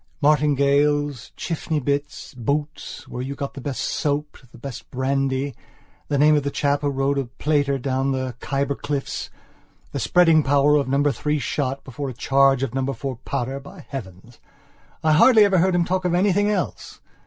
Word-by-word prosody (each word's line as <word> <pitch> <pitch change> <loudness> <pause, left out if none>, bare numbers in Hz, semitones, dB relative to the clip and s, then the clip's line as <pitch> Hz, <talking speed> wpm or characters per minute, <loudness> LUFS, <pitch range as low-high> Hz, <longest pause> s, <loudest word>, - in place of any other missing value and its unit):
Martingales, 145 -2 +2
Chiffney 160 -1 -2
bits, 145 +2 -3
boots; 140 +4 -4
where 125 - -6
you 135 +2 -4
got 140 0 -5
the 135 - -8
best 135 -1 -3
soap, 150 -1 -1 0.2
the - - -14
best 125 0 -8
brandy, 135 +1 -1 0.5
the 145 - 0
name 150 +2 +5
of 145 - +2
the 140 - -2
chap 140 0 0
who 145 - 0
rode 140 0 0
a 135 - -2
plater 140 +2 0
down 135 +1 -1
the 130 -1 -2
Khyber 140 +1 -1
cliffs; 145 0 -4 0.6
the - - -3
spreading 165 -3 +4
power 145 +1 +3
of 140 - 0
number 140 +2 +2
three 150 +4 -1
shot 140 -1 -2
before 135 +1 -5
a - - -6
charge 135 +2 +3
of 135 - -3
number 135 +1 -1
four 130 0 -5
powder... 130 +1 -3
by 140 - -13
heavens, 110 -3 -9 0.6
I 155 - +3
hardly 215 +7 +7
ever 195 -3 +3
heard 185 +1 +2
him 175 -1 +2
talk 185 +1 -1
of 180 -1 +1
anything 205 +2 +2
else. 200 -4 -3
140 Hz, 175 wpm, -23 LUFS, 135-150 Hz, 0.6 s, hardly